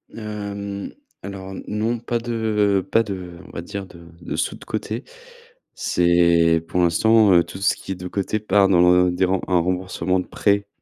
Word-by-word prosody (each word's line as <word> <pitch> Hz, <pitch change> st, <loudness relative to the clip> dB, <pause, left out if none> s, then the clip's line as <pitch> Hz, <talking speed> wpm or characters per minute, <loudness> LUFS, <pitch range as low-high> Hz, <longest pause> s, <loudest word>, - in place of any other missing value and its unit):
Hem, 100 Hz, -2 st, -5 dB, 0.3 s
alors 95 Hz, -1 st, -7 dB
non 110 Hz, +3 st, -1 dB
pas 120 Hz, +1 st, -2 dB
de 110 Hz, -4 st, 0 dB
pas 115 Hz, -, +4 dB
de 90 Hz, -4 st, -7 dB
on -, -, -13 dB
va -, -, -6 dB
dire 100 Hz, +3 st, -6 dB
de 85 Hz, -2 st, -15 dB
de -, -, -5 dB
sous -, -, -1 dB
de -, -, -14 dB
côté. 115 Hz, +5 st, -4 dB, 0.7 s
C'est 85 Hz, -1 st, +3 dB
pour 90 Hz, -, 0 dB
l'instant, 105 Hz, +5 st, +4 dB
heu, 85 Hz, -1 st, +6 dB
tout 95 Hz, -, -10 dB
ce 100 Hz, -, +2 dB
qui -, -, -9 dB
est -, -, -8 dB
de 90 Hz, 0 st, -7 dB
côté 100 Hz, +3 st, -2 dB
part 100 Hz, -2 st, +3 dB
dans 90 Hz, -3 st, +4 dB, 0.2 s
le 90 Hz, -, +1 dB
des 90 Hz, +2 st, +1 dB
rem 95 Hz, 0 st, 0 dB
un 90 Hz, -2 st, +3 dB
remboursement 90 Hz, +1 st, -1 dB
de 90 Hz, -, -4 dB
prêt, 100 Hz, 0 st, +1 dB
95 Hz, 190 wpm, -22 LUFS, 90-105 Hz, 0.7 s, heu